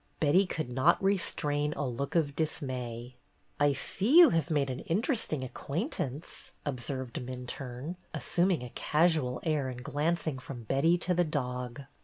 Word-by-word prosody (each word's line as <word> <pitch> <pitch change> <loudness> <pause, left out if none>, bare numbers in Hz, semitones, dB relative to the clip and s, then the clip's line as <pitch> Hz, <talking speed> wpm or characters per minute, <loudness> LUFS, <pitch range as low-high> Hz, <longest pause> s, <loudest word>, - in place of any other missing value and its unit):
Betty 175 +6 +4
could 155 -7 -3
not 135 +7 +4
restrain 150 -6 +1
a 145 - -2
look 130 +5 -4
of 145 -4 +2
dismay. 125 -5 -3 0.4
"I 145 -1 +4
see 205 - +2
you 345 -5 +10
have 165 -1 +1
made 140 -4 +1
an 130 - -4
interesting 205 - 0
ac 130 - -6
quaintance," 150 - -4 0.2
observed 130 -2 -3
Minturne, 125 +4 -6
assuming 175 -5 +1
a 125 - -8
casual 155 -5 +1
air 150 -5 0
and 125 -1 -7
glancing 155 -1 -1
from 125 -2 -8
Betty 140 +9 +3
to 180 +1 0
the 175 0 +3
dog. 125 -4 -3
145 Hz, 150 wpm, -30 LUFS, 130-165 Hz, 0.4 s, you